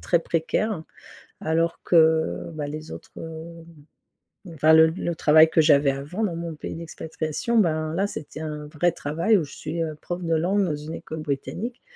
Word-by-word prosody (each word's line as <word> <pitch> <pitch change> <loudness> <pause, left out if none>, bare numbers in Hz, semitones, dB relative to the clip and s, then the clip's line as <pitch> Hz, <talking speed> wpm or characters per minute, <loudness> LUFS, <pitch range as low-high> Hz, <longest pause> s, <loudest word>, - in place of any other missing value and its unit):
très 170 - +2
précaire. 170 +4 -1 0.6
Alors 165 +1 0
que, 160 -1 +3
bah, 150 -2 -4
les 155 +2 -7
autres, 165 +1 -10
heu, 165 0 -7 1.2
enfin 155 +1 +4
le 160 0 +8
le 170 +1 -3
travail 160 0 +6
que 160 - +4
j'avais 145 -2 +5
avant 145 +11 -3
dans 175 -5 -2
mon 170 -1 -5
pays 150 - -6
d'expatriation, 160 - -3
ben, 155 -5 +1
là 195 +4 +1
c'était 155 -4 -7
un 150 -1 -5
vrai 165 +3 +1
travail 165 +8 +1
où 175 - +1
je 145 - -11
suis, 165 +2 -4
heu, 155 -1 -3
prof 175 +1 -5
de 165 -1 0
langue 190 +5 +2
dans 155 -5 -1
une 150 +2 -7
école 160 -1 -7
britannique 155 - -4
160 Hz, 180 wpm, -24 LUFS, 155-170 Hz, 1.2 s, le